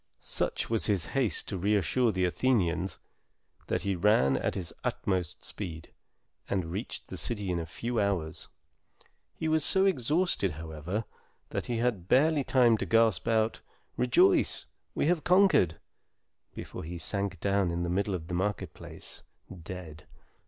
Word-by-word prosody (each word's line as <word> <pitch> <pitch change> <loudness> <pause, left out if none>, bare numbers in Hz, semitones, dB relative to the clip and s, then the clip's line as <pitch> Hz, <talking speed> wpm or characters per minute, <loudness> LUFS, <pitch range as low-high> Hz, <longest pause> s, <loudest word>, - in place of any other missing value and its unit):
Such - - -2
was 115 -1 +1
his 100 -6 +2
haste 130 -6 +1
to 95 - -3
reassure 105 +5 +2
the 95 -2 +1
Athenians, 90 -4 +1 0.7
that - - -1
he 100 - 0
ran 90 -8 +3
at - - -1
his 90 -4 -3
utmost 90 -5 -2
speed, 85 -6 -6 0.6
and 90 -4 -1
reached 100 +7 -3
the - - -6
city 105 -6 0
in 85 - -1
a 80 - -5
few 115 +9 -3
hours. 95 -6 -1 0.9
He 160 - -3
was 160 -1 +2
so 190 +5 +4
exhausted, 155 - +1
however, 80 +7 -4 0.4
that - - -3
he 120 - -1
had 115 -7 -1
barely 150 +4 +4
time 120 -4 +4
to - - -1
gasp 115 -4 +3
out, 110 -1 +1 0.3
"Rejoice, 125 -1 +3 0.3
we - - +1
have 165 0 +2
conquered!" 180 - +4 0.8
before - - -7
he 85 +2 -6
sank 100 +1 -1
down 100 -1 +1
in 85 0 -2
the - - -1
middle 95 +2 0
of 80 -2 -6
the 90 - -5
market 95 +3 -1
place, - - -6 0.3
dead. 85 -3 -9
100 Hz, 150 wpm, -29 LUFS, 85-120 Hz, 0.9 s, so